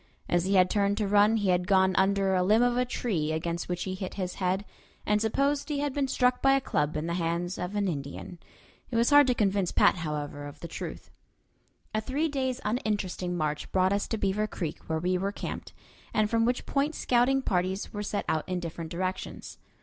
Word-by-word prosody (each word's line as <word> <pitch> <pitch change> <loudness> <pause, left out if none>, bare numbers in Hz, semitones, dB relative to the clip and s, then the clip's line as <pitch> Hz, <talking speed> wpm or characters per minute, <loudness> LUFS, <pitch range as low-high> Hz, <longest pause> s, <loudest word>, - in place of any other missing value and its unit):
As 175 0 +1
he 195 +1 +1
had 185 -1 +6
turned 200 +1 +1
to 210 -2 0
run 205 +2 +4
he 205 -3 0
had 180 0 +2
gone 190 -2 +4
under 195 0 +2
a 185 - +3
limb 215 +6 +4
of 245 0 +2
a 250 0 +2
tree 185 -11 -1
against 170 +2 -3
which 175 -1 -2
he 190 - -3
hit 185 0 -5
his 185 -2 -3
head, 190 +2 0 0.4
and 210 0 +2
supposed 275 +7 +1
he 295 - -1
had 285 -1 -1
been 280 -1 0
struck 250 -1 +2
by 270 0 +5
a - - +3
club 150 - -1
in 155 - -2
the 170 - -2
hands 170 +1 -2
of 180 +3 -4
an 205 -1 +1
Indian. 145 +2 -5 0.5
It 240 - -5
was 235 +4 +3
hard 290 -1 +7
to 250 - +2
convince 195 -4 +1
Pat, - - +4
however, 150 -3 -4
of 145 +1 -11
the 170 - -5
truth. - - -7 0.8
A 215 - 0
three 280 +8 -1
days' 260 -3 -1
uninteresting 205 -5 -1
march 150 -2 -2
brought 185 +1 +3
us 200 - 0
to 225 - -2
Beaver 205 +1 0
Creek, 165 -7 -6
where 160 - +1
we 180 +3 0
were 195 +2 -1
camped, - - -6 0.4
and 215 0 +2
from 230 0 +3
which 245 +1 0
point 290 +2 0
scouting 255 +2 +2
parties 185 0 -1
were 205 - -3
sent 205 0 -2
out 155 +2 -1
in 180 -1 -1
different 165 -1 -6
directions. 185 +2 -4
195 Hz, 220 wpm, -28 LUFS, 175-230 Hz, 0.8 s, hard